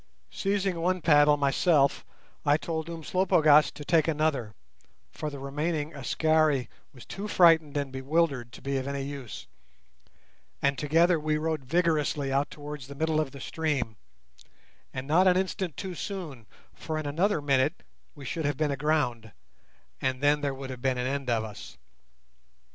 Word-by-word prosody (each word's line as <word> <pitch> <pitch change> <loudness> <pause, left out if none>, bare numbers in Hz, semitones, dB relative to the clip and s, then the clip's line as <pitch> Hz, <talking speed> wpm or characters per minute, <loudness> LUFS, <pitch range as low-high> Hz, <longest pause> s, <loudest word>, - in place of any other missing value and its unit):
Seizing 195 -3 -1
one 185 +2 +1
paddle 150 -3 +5
myself, 140 +1 +2 0.4
I 145 +1 +4
told 160 0 -4
Umslopogaas 160 -2 +3
to 145 - -9
take 165 -1 +3
another 150 -8 0 0.6
(for 155 - -4
the 145 - -8
remaining 150 +3 -3
Askari 150 0 +1 0.2
was 125 - -14
too 200 +2 -6
frightened 165 -6 +4
and 140 -2 -2
bewildered 135 -2 0
to - - -12
be 140 0 -1
of 130 0 -3
any 140 -1 -3
use), 135 -5 -7 1.1
and 140 0 +1
together 165 +5 +3
we 155 0 0
rowed 155 -3 -2
vigorously 150 -3 +1
out 140 +1 +1
towards 145 -3 -8
the 140 - -9
middle 155 +1 0
of 155 -3 0
the 140 - -11
stream; 140 -7 -2 1.0
and 130 0 -5
not 175 +5 +4
an 180 0 +5
instant 185 -4 -2
too 190 -1 -5
soon, 160 - -6 0.3
for 155 -1 -5
in 155 - -4
another 170 +6 +1
minute 140 +1 +1 0.3
we 140 -2 -10
should 160 +4 -3
have 145 -2 0
been 150 -1 0
aground, 140 -6 -1 0.7
and 130 -1 -1
then 145 +1 +3
there 140 -2 -1
would 135 0 -7
have 125 -1 -8
been 130 -1 0
an 125 - -1
end 135 0 -2
of 115 -2 +1
us. 105 -2 -9
150 Hz, 160 wpm, -28 LUFS, 135-160 Hz, 1.1 s, paddle